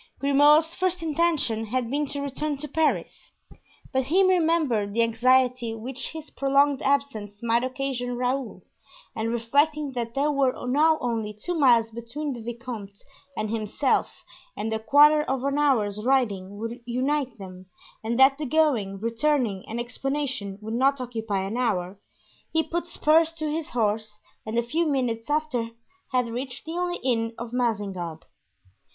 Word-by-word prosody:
Grimaud's 295 +4 +4
first 365 -1 -1
intention 305 -8 +1
had 240 +1 -2
been 290 +1 0
to 285 +1 -4
return 285 +1 -3
to 300 +2 -6
Paris, 315 +2 -1 0.6
but 265 -1 +1
he 360 +8 +3
remembered 320 - +2
the 230 - +4
anxiety 245 0 +2
which 250 +4 -5
his 315 -1 -9
prolonged 275 0 +2
absence 235 -7 -1
might 235 +1 +2
occasion 255 -2 -3
Raoul, 250 0 -2 0.5
and 220 +1 -2
reflecting 285 +6 +1
that 235 -2 -4
there 290 +2 +2
were 275 -3 +2
now 305 +5 +3
only 225 -3 -2
two 355 - -3
miles 240 -8 +4
between 235 +6 -5
the 240 - -8
vicomte 230 -4 -7 0.4
and 215 0 -2
himself 225 +5 -1 0.3
and 220 +1 -2
a 220 - -1
quarter 295 +6 +6
of 265 -3 -2
an 280 +1 0
hour's 215 -8 +1
riding 205 -7 0
would 230 +3 -5
unite 260 +1 -1
them, 185 -2 -10 0.4
and 230 +1 -1
that 270 +1 +6
the 305 - -2
going, 250 -10 +1
returning 230 -2 0
and 225 +2 -4
explanation 250 -5 -3
would 220 +1 -5
not 270 +3 +2
occupy 225 -5 -3
an 200 +5 -3
hour, 195 -6 -1 0.5
he 320 0 +2
put 345 +2 -3
spurs 325 0 +3
to 310 -2 -3
his 315 0 -3
horse 215 -2 -1 0.3
and 220 +2 -2
a 235 - +3
few 315 +8 0
minutes 250 -4 -1
after 290 -6 0 0.4
had 250 -2 +1
reached 250 +2 -5
the 320 - -6
only 355 +1 -1
inn 230 -3 0
of 235 0 -7
Mazingarbe. 195 -9 -2
250 Hz, 155 wpm, -25 LUFS, 225-290 Hz, 0.6 s, quarter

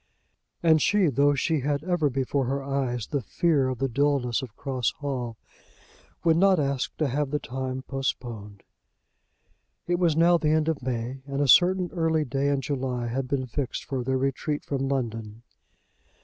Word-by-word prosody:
And 160 -2 +5
she, 205 -5 +3
though 145 +2 +3
she 155 +3 +1
had 140 +2 -1
ever 175 -4 +1
before 135 +1 -1
her 135 +2 -2
eyes 130 -5 -2
the 140 +4 -2
fear 150 - +1
of 130 -1 -2
the 135 +3 0
dullness 135 -1 +1
of 120 -6 -9
Cross 130 -4 -1
Hall, 125 -6 -4 0.9
would 165 -1 +4
not 190 -1 +4
ask 140 -2 -1
to 155 - +1
have 140 +2 -1
the 150 - 0
time 130 -1 -4
postponed. 120 -7 -4 1.2
It 175 0 0
was 165 -4 +2
now 170 +1 +5
the 155 - +1
end 155 0 +2
of 160 -4 -1
May, 125 +1 -3
and 140 0 -3
a 145 - +2
certain 180 +5 +5
early 160 -3 +1
day 135 +2 -1
in 140 -1 +1
July 130 -3 -2
had 130 +2 -2
been 130 -1 -1
fixed 130 +1 -4
for 130 -2 -3
their 130 +1 0
retreat 135 +3 -1
from 135 -1 -2
London. 115 -4 -3
135 Hz, 175 wpm, -26 LUFS, 130-150 Hz, 1.2 s, And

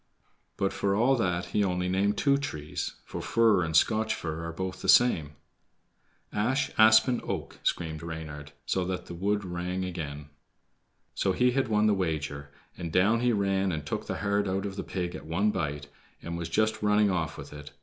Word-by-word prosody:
But 95 - 0
for 100 -1 0
all 125 +6 +4
that 90 -5 0
he 105 - +3
only 90 -1 0
named 100 +3 +1
two 140 -1 +3
trees, 75 - -4
for - - -6
fir 110 -5 +3
and 80 -1 -2
Scotch 110 +3 +2
fir 80 0 -5
are 85 - -4
both 95 +2 -5
the - - -2
same. 80 -12 +5 1.0
"Ash, 130 +6 0
Aspen, 110 +3 +6
Oak," - - -5
screamed 80 -2 -2
Reynard, 75 -3 -7
so 95 - 0
that 90 0 -3
the - - -8
wood 100 +3 -1
rang 90 +1 -3
again. 75 -5 -6 0.8
So 95 - 0
he 125 +5 +3
had 130 0 +1
won 105 -1 +2
the 105 - +4
wager, 75 -6 -2 0.3
and 85 -3 -5
down 100 +7 +3
he 125 0 +2
ran 95 -2 +1
and 75 -3 -4
took - - -4
the - - -3
heart 100 0 0
out 95 +1 -1
of 100 -1 -4
the - - -4
pig 90 -2 -3
at - - -9
one 100 +6 +1
bite, 75 -5 -3 0.3
and 85 0 -6
was 85 -1 -4
just 110 0 +1
running 105 -1 +3
off 85 -3 -2
with - - -9
it. 75 0 -9
95 Hz, 190 wpm, -28 LUFS, 80-105 Hz, 1.0 s, Aspen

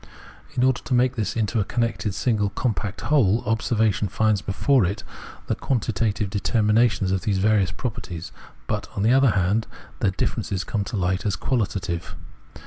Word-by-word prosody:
In 125 - +2
order 130 -1 +2
to 130 - -1
make 125 +1 +3
this 110 -2 -2
into 110 0 0
a - - +3
connected 115 -3 -1
single 105 -3 +1
compact 105 -2 -2
whole, 120 -7 +3
observation 110 -1 +1
finds 105 0 +1
before 125 +6 +2
it 95 +4 -2 0.4
the - - 0
quantitative 110 -5 -1
determinations 105 -1 +2
of 95 -1 0
these 105 -4 0
various 100 -1 +3
properties, 90 -4 -5 0.3
but, - - -3
on 100 - -1
the 115 +3 +4
other 135 -1 +5
hand, 100 +2 +1 0.3
their 100 - +2
differences 95 0 -2
come 100 +2 -2
to 105 - -4
light 95 0 0
as 100 -3 0
quahtative. 95 -5 -2
105 Hz, 160 wpm, -24 LUFS, 95-115 Hz, 0.4 s, other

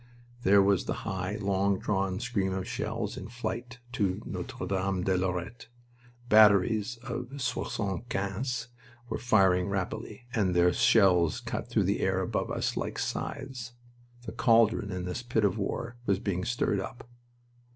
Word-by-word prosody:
There 100 -2 +6
was 100 -2 +2
the - - -1
high, 95 +1 -2
long 100 -1 +1
drawn 95 -1 -1
scream 95 -1 -1
of 95 0 -3
shells 110 -1 -3
in - - -6
flight 120 +1 -5
to 100 -7 0
Notre - - -5
Dame 95 -1 -1
de 95 0 +2
Lorette. 95 +5 -3 0.6
Batteries 105 +1 +5
of 130 +2 -5
soixante 115 -5 -2
quinzes 115 +5 -2 0.4
were 110 - -2
firing 95 -6 +3
rapidly, 100 +5 -4
and 95 -5 +1
their 90 0 +4
shells 90 -7 +4
cut - - -5
through - - +2
the - - 0
air - - +1
above - - -1
us - - -1
like - - -3
scythes. 125 -4 -4 0.5
The 115 - -6
caldron 115 -3 +3
in 90 -2 -4
this 90 +6 -3
pit 115 -3 +1
of 100 +2 0
war 115 +4 -3
was 100 - +3
being 95 -2 -2
stirred 115 -4 0
up. 120 +5 -7
100 Hz, 150 wpm, -29 LUFS, 95-115 Hz, 0.6 s, There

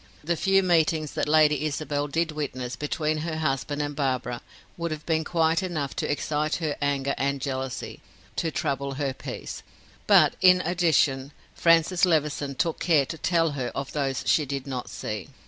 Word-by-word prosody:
The 170 +3 0
few 195 +3 +3
meetings 160 -3 +2
that - - -2
Lady 150 -1 +4
Isabel 145 -1 -2
did 160 +3 0
witness 130 -5 -4
between 155 +1 -1
her 160 0 -3
husband 145 -1 -1
and 145 0 -4
Barbara 130 -4 -1 0.3
would 170 0 -3
have 155 -1 -6
been 160 -1 +1
quite 165 +1 +2
enough 160 -7 -3
to - - -1
excite 150 +1 -1
her 155 -4 -2
anger 140 -1 0
and 140 +1 0
jealousy, 130 -1 -4 0.4
to 165 - 0
trouble 140 -1 -2
her 140 -1 -1
peace; - - -7 0.5
but, - - +6
in 185 -1 +7
addition, 155 -6 +1 0.2
Francis 165 +1 +3
Levison 150 -5 +1
took 165 +1 -1
care 155 -5 +3
to 165 - -6
tell 165 -3 +2
her 130 -4 -3
of 140 0 -4
those 135 -3 -1
she 155 - +3
did 140 -1 -4
not 130 -3 -5
see. 105 -4 -5
150 Hz, 170 wpm, -26 LUFS, 140-165 Hz, 0.5 s, in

